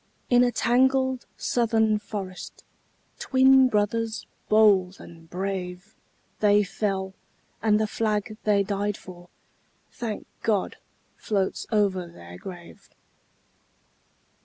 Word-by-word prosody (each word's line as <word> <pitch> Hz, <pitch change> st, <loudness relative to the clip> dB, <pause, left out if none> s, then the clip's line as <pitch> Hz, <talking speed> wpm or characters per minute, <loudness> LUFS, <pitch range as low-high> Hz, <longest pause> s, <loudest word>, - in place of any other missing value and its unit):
In 245 Hz, 0 st, +6 dB
a 245 Hz, -, +2 dB
tangled 260 Hz, +2 st, +2 dB
Southern 220 Hz, -3 st, +1 dB
forest, 195 Hz, -3 st, -7 dB, 0.6 s
Twin 265 Hz, 0 st, +5 dB
brothers 220 Hz, +1 st, -1 dB, 0.2 s
bold 200 Hz, -4 st, +4 dB
and 165 Hz, -1 st, -14 dB
brave, 185 Hz, +2 st, -5 dB, 0.5 s
They 205 Hz, 0 st, +4 dB
fell; 195 Hz, -1 st, -2 dB, 0.5 s
and 210 Hz, -1 st, +3 dB
the 215 Hz, -, +2 dB
flag 215 Hz, -1 st, -2 dB
they 205 Hz, -2 st, +3 dB
died 205 Hz, +1 st, -2 dB
for, 175 Hz, -1 st, -13 dB, 0.6 s
Thank 225 Hz, -4 st, -5 dB, 0.2 s
God! 210 Hz, -4 st, 0 dB, 0.4 s
floats 195 Hz, -4 st, -2 dB
over 195 Hz, -5 st, +1 dB
their 90 Hz, -, -12 dB
grave. 175 Hz, -3 st, -11 dB
210 Hz, 100 wpm, -25 LUFS, 190-225 Hz, 0.6 s, In